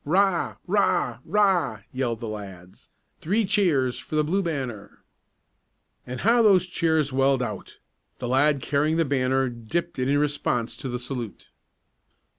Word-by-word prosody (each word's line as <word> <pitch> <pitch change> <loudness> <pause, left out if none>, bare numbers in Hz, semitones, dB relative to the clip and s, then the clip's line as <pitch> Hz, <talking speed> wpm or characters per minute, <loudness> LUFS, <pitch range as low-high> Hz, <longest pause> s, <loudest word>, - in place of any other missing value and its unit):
'Rah!" 185 +3 +1 1.4
yelled 125 -3 -2
the 115 - -4
lads. 95 -4 -9 0.3
"Three 205 +7 +1
cheers 170 -11 +1
for - - -6
the 155 - +3
Blue 185 +6 0
Banner!" 130 - -5 1.0
And 125 0 -5
how 230 +3 +4
those 195 -5 +5
cheers 160 -5 0
welled 135 -1 +2
out! 105 -5 -6 0.4
The 125 - -5
lad 135 +3 +2
carrying 150 +3 +1
the 165 - +2
banner 135 -1 +1
dipped 130 +8 -4
it 130 +1 0
in 145 - +3
response 145 -5 -1
to 135 - -6
the 125 0 -3
salute. 120 -5 -6
135 Hz, 135 wpm, -25 LUFS, 125-165 Hz, 1.4 s, those